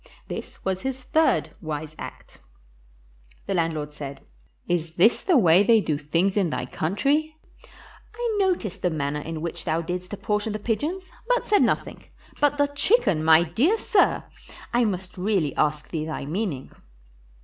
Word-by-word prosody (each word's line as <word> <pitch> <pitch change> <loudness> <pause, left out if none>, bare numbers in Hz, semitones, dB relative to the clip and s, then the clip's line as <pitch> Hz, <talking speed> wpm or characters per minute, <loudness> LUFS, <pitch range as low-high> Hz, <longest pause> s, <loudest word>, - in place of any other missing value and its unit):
This - - -8
was 190 -1 -1
his 265 -1 -4
third 315 +5 +2
wise 155 -1 -5
act. - - -10 1.1
The - - -2
landlord 160 -4 -1
said, 140 -2 -8 0.4
"Is 165 -2 -1
this 215 +7 +4
the 360 -5 +3
way 180 -5 +6
they 225 +2 +5
do 155 -7 -1
tilings 170 +6 0
in 190 -4 +2
thy - - -3
country? 285 - 0 0.8
I 465 -2 -1
noticed 250 - 0
the 180 - +2
manner 150 -2 -2
in 160 +1 -5
which 170 0 -4
thou 160 0 0
didst 180 +1 -5
apportion 210 +1 -2
the - - -2
pigeons, 305 - -3 0.2
but - - +2
said 415 - +3
nothing; - - 0 0.4
but 290 0 +3
the 285 - +4
chicken, 285 - +2
my 160 +1 +6
dear 245 - +2
sir! 430 -3 +2 0.5
I 240 0 +3
must 185 -3 -4
really 185 -7 0
ask 150 0 0
thee 155 -2 -3
thy 155 -3 -4
meaning." 160 -4 -3
190 Hz, 160 wpm, -25 LUFS, 160-265 Hz, 1.1 s, way